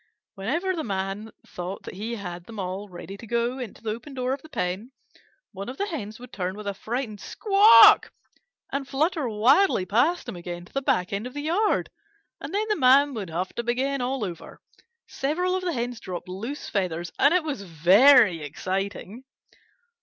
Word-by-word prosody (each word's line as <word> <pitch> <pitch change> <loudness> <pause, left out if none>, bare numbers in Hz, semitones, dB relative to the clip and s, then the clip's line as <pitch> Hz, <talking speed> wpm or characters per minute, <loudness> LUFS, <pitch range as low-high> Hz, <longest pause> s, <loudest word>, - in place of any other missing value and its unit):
Whenever 330 - -1
the 320 - -3
Man 195 +1 -3 0.2
thought 180 +2 -7
that - - -8
he 220 +5 -4
had 175 -4 -7
them 225 - -10
all 195 +2 -4
ready 190 +2 -9
to 225 - -11
go 235 +3 -1
into 240 -4 -8
the 220 - -2
open 255 +6 -8
door 255 0 -1
of 275 - -5
the 315 - -15
pen, 200 -2 -3 0.6
one 200 +2 -7
of 260 - -7
the 405 - -1
Hens 220 - -6
would 250 0 -12
turn 185 -1 -3
with 210 - -8
a 200 - -2
frightened 220 +1 -4
squawk 415 0 +6 0.6
and 275 -1 -3
flutter 300 -1 0
wildly 235 - +3
past 250 - +1
him - - -5
again 175 0 -7
to - - -21
the 275 - -1
back 180 -8 0
end 205 +5 -2
of 250 - -12
the 290 - -4
yard, 380 +7 +1 0.5
and - - -7
then 420 +2 -1
the 425 - +1
Man 275 0 +5
would 205 -7 -5
have 175 +3 -3
to - - -2
begin 260 +3 -1
all 250 -2 -1
over. 175 -3 -9 0.5
Several 355 +7 -1
of 375 - -2
the 350 -2 -1
Hens 240 -2 -3
dropped 180 -5 -7
loose 225 +11 -6
feathers, 175 -4 -2
and 285 - +5
it 360 -1 +3
was 290 -9 -4
very 190 - +5
exciting. 195 - -4
230 Hz, 190 wpm, -25 LUFS, 195-275 Hz, 0.6 s, squawk